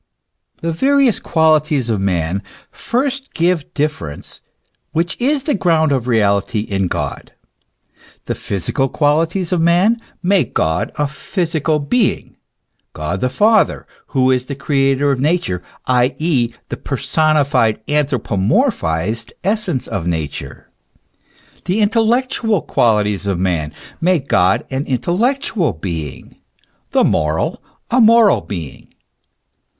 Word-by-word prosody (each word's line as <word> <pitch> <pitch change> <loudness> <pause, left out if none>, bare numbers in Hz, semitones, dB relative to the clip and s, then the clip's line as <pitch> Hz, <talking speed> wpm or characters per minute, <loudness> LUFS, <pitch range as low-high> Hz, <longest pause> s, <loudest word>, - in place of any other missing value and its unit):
The 165 - 0
various 270 - +2
qualities 155 -5 +2
of 110 -4 -1
man 90 -1 -1 0.3
first 270 +2 -3
give 170 -3 0
difference, 140 - -4 0.5
which 170 +2 0
is 275 +2 +1
the 295 - 0
ground 165 -5 +2
of 130 -3 0
reality 105 -2 +1
in 95 -3 -1
God. - - -4 0.9
The - - -2
physical 100 +8 -2
qualities 165 +5 +1
of 180 -2 +1
man 180 +8 +3 0.2
make 190 0 +1
God 80 +2 0
a 150 - 0
physical 160 0 -1
being 205 +10 0 0.6
God 75 +5 -4
the 125 - +1
Father, 215 - +2 0.2
who 130 -2 +2
is 125 0 0
the 140 - -4
creator 135 0 +1
of 135 - -1
Nature, 145 - 0 0.2
i. 125 0 +2
e., 145 -8 +1 0.2
the - - -4
per - - -4
sonified, 140 -8 +2
anthropomorphized 115 - 0
essence 205 - 0
of 90 -4 -4
Nature;* 80 -4 -5 0.9
the 185 +4 0
intel 220 +1 +2
lectual 235 - 0
qualities 105 -3 +1
of 95 -3 0
man 85 -5 -1 0.3
make 165 -5 +1
God 90 +2 +2
an 135 +2 -2
intellectual 190 - 0
being, 80 -4 -6 0.5
the - - +3
moral, 80 +1 0 0.3
a 250 +1 +4
moral 225 -1 +5
being. 85 -8 -8
145 Hz, 120 wpm, -17 LUFS, -, 0.9 s, moral